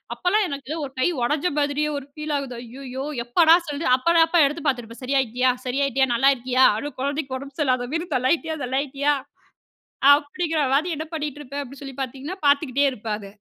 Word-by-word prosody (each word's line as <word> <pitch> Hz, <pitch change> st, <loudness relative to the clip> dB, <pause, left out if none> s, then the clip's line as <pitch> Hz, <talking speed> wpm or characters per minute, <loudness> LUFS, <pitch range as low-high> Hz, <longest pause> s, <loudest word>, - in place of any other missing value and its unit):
அப்பல்லாம் 405 Hz, +3 st, +1 dB
எனக்கு 280 Hz, 0 st, -6 dB
ஒரு 270 Hz, -, -5 dB
கை 255 Hz, -, +3 dB, 0.2 s
ஒடைஞ்ச 295 Hz, +7 st, +1 dB
மாதிரியே 290 Hz, +1 st, 0 dB
ஒரு 275 Hz, -, -7 dB
பீல் 300 Hz, 0 st, -3 dB
ஆகுது. 265 Hz, -3 st, -5 dB
ஐயையோ! 260 Hz, +2 st, -7 dB, 0.2 s
எப்படா 325 Hz, +7 st, +6 dB
சொல்லு 290 Hz, +3 st, -3 dB
அப்பதான் 330 Hz, +5 st, +4 dB
அப்ப 330 Hz, -2 st, +4 dB
எடுத்துப் 300 Hz, +1 st, -4 dB
பாத்துருப்பேன். 245 Hz, -2 st, -2 dB
"சரியாயிட்டியா? 255 Hz, -1 st, +1 dB
சரியாயிட்டியா? 270 Hz, 0 st, +1 dB
நல்லா 270 Hz, +4 st, +4 dB
இருக்கியா? 255 Hz, +1 st, +3 dB
அதுவும் 290 Hz, +3 st, -6 dB
கொழந்தைக்கு 280 Hz, -1 st, -2 dB
உடம்பு 275 Hz, +1 st, -10 dB
சரியில்லாத 255 Hz, -3 st, +1 dB
மாரி 335 Hz, +1 st, -2 dB
தள்ளாயிட்டியா, 315 Hz, +5 st, +1 dB
தள்ளாயிட்டியா" 275 Hz, +3 st, 0 dB, 1.0 s
அப்டிங்கிற 310 Hz, +2 st, 0 dB
மாதிரி 325 Hz, +5 st, +1 dB
என்ன 315 Hz, -, -4 dB
பண்ணிட்டுருப்பேன், 290 Hz, -2 st, -5 dB
அப்டின்னு 275 Hz, +2 st, -12 dB
சொல்லிப் 270 Hz, 0 st, -7 dB
பாத்தீங்கன்னா, 275 Hz, +8 st, -6 dB
பார்த்துக்கிட்டே 285 Hz, -1 st, +3 dB
இருப்பேன் 215 Hz, -3 st, -4 dB
அத. 200 Hz, -, -10 dB
280 Hz, 165 wpm, -23 LUFS, 260-300 Hz, 1.0 s, எப்படா